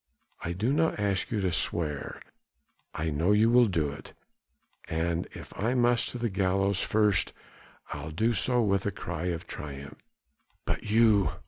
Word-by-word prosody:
I 85 - -2
don't 120 - 0 0.2
ask 100 -2 0
you 105 -3 -1
to 95 -2 0
swear 75 -1 -1 0.7
I 80 +1 -2
know 80 +7 +2
you'll 115 +3 +5
do 80 -7 0
it 70 - -11 0.7
and 85 +1 -1
if - - -10
I 115 +5 0
must 120 -1 +3
to - - -6
the 120 0 -1
gallows 95 -1 +1
first 105 -4 +2 0.6
I'll - - -6
do 110 +10 +1
so 125 +1 +2
with 100 -1 +1
a - - 0
cry 90 -3 -5
of 85 -2 -2
triumph." 70 -1 -8 0.7
"But - - -2
you...." 110 -2 +4
100 Hz, 150 wpm, -28 LUFS, 85-110 Hz, 0.7 s, you'll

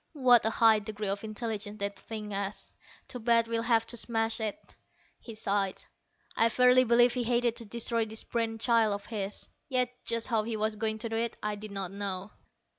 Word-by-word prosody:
What 250 -5 +5
a - - +3
high 225 -1 +5
degree 210 -1 -4
of 200 +1 -2
intelligence 215 -1 -4
that 200 -1 -2
thing 215 -2 -7
has! 200 0 -3 0.3
Too 250 - -6
bad 230 0 +3
we'll 230 0 -1
have 230 -1 +2
to 235 - -4
smash 225 0 0
it." 220 +8 -4 0.4
He 230 - -10
sighed. 200 -2 0 0.5
I 230 - +4
verily 250 +2 +5
believe 240 +1 +5
he 250 - -1
hated 240 0 +1
to 230 - -5
destroy 230 +1 0
this 220 0 -4
brain 225 -1 -2
child 225 -2 +3
of 200 - -9
his. 205 -3 -4 0.2
Yet 250 -2 +1
just 230 +1 -1
how 225 -3 +2
he 220 0 -3
was 215 0 0
going 220 0 -2
to 225 +1 -5
do 225 - -2
it, 230 0 -1
I 210 0 -1
did 210 +1 -7
not 195 -2 -4
know. 195 0 -4
225 Hz, 200 wpm, -29 LUFS, 210-235 Hz, 0.5 s, What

